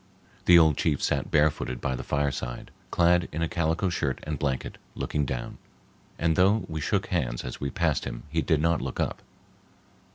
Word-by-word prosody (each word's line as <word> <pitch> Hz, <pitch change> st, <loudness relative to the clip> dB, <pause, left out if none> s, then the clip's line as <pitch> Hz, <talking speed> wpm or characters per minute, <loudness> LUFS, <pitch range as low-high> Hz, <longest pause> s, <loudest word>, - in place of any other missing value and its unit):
The 90 Hz, -, +8 dB
old 80 Hz, -3 st, +5 dB
chief 75 Hz, -4 st, +1 dB
sat -, -, 0 dB
barefooted 75 Hz, -5 st, +1 dB
by 65 Hz, -, -1 dB
the -, -, -5 dB
fireside, 70 Hz, -4 st, -2 dB, 0.2 s
clad 90 Hz, 0 st, +3 dB
in 80 Hz, +2 st, -2 dB
a -, -, +1 dB
calico 85 Hz, +3 st, 0 dB
shirt 70 Hz, -6 st, -1 dB
and 75 Hz, -2 st, -4 dB
blanket, 70 Hz, -3 st, -2 dB, 0.2 s
looking 75 Hz, -1 st, -1 dB
down, 60 Hz, -2 st, -5 dB, 0.6 s
and 80 Hz, 0 st, +1 dB
though 100 Hz, +5 st, +3 dB
we 80 Hz, -2 st, -4 dB
shook 100 Hz, +6 st, 0 dB
hands 65 Hz, -, -1 dB
as 60 Hz, -, -7 dB
we 70 Hz, -, -1 dB
passed -, -, 0 dB
him -, -, -6 dB
he 80 Hz, +3 st, 0 dB
did 80 Hz, -3 st, +1 dB
not 85 Hz, 0 st, +2 dB
look -, -, -5 dB
up. -, -, -1 dB
80 Hz, 185 wpm, -27 LUFS, 70-85 Hz, 0.6 s, The